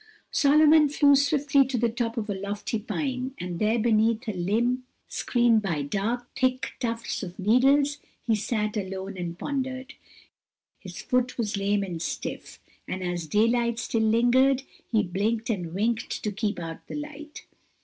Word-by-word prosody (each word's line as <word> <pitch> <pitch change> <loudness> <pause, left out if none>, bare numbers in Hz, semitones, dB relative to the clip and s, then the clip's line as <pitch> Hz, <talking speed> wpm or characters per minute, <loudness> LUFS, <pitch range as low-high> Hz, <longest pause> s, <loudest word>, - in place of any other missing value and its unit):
Solomon 300 +1 +5
flew 285 0 +5
swiftly 280 0 +3
to 265 -2 -2
the 235 +1 +2
top 230 0 -3
of 220 -2 -2
a 205 - -1
lofty 200 +3 -3
pine, 260 +3 -3
and 175 -1 -4
there 215 +2 +2
beneath 225 +1 +2
a 215 - -1
limb, 230 +8 0 0.2
screened 235 -3 +2
by 170 -8 -1
dark, 220 - -2
thick 255 -1 0
tufts 230 -1 -3
of 180 -3 -7
needles 275 +8 +3 0.3
he 230 - +2
sat 210 0 -1
alone 195 -1 -4
and 175 -2 -5
pondered. 260 +1 -4 0.9
His - - -9
foot 250 -1 0
was 215 -4 -1
lame 200 0 +1
and 175 -4 -5
stiff, 160 - -5 0.3
and 185 0 -4
as 175 -2 -3
daylight 230 +5 +2
still 230 -1 -1
lingered 245 +4 +3 0.3
he 220 -3 +3
blinked 215 +5 -1
and 175 -6 -3
winked 225 +5 -1
to 210 - -1
keep 210 +1 -2
out 165 -2 -7
the - - -6
light. 295 0 -8
230 Hz, 160 wpm, -26 LUFS, 200-255 Hz, 0.9 s, Solomon